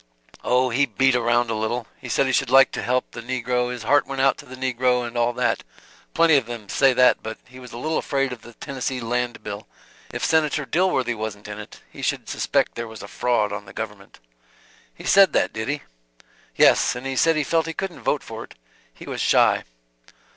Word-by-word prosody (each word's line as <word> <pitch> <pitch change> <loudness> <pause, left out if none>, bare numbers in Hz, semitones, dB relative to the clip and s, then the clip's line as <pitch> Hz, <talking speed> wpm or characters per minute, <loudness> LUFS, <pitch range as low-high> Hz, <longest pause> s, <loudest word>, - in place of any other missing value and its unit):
"Oh, 125 0 +2
he 140 +4 +2
beat 135 -1 +2
around 120 -1 +2
a - - 0
little. 110 +2 -2
He - - -9
said 140 - +2
he 130 - 0
should 135 -2 +1
like 135 +1 +6
to - - -4
help 125 +1 -1
the 120 - -8
negro, 125 0 -1
his 125 -2 -6
heart 145 +6 +3
went 135 -1 -5
out 135 +1 +4
to 145 - -12
the 130 - -9
negro, 125 -1 0
and 120 0 -7
all 120 0 +2
that 125 +1 0 0.5
plenty 165 -2 +5
of 125 -4 -1
them 115 -4 -7
say 135 +3 +4
that 125 0 +4
but 110 0 -6
he 125 +1 -13
was 125 -2 -11
a 120 - -8
little 155 +5 -1
afraid 135 -2 -1
of 120 - -10
the 120 - -13
Tennessee 130 +1 -4
Land 120 -1 -2
bill; 100 0 -7 0.4
if - - -3
Senator 155 -2 +1
Dilworthy 135 -8 +1
wasn't 110 -2 -6
in 105 0 -7
it, 105 - -11
he - - -10
should - - -2
suspect - - 0
there 115 0 -5
was 110 0 -10
a - - -8
fraud 110 -4 0
on 105 0 -6
the 95 - -13
government." - - -7 0.7
"He - - -14
said 195 -1 +5
that, - - +1
did 110 0 -4
he?" 145 +1 -2 0.7
"Yes. - - +4
And 125 +2 -7
he 135 0 -2
said 165 +5 +3
he 155 - +1
felt 165 +2 +1
he 165 - -3
couldn't 190 +1 -5
vote - - 0
for - - -7
it. - - -15 0.4
He - - -13
was - - -4
shy." - - +3
125 Hz, 225 wpm, -23 LUFS, 115-135 Hz, 0.7 s, like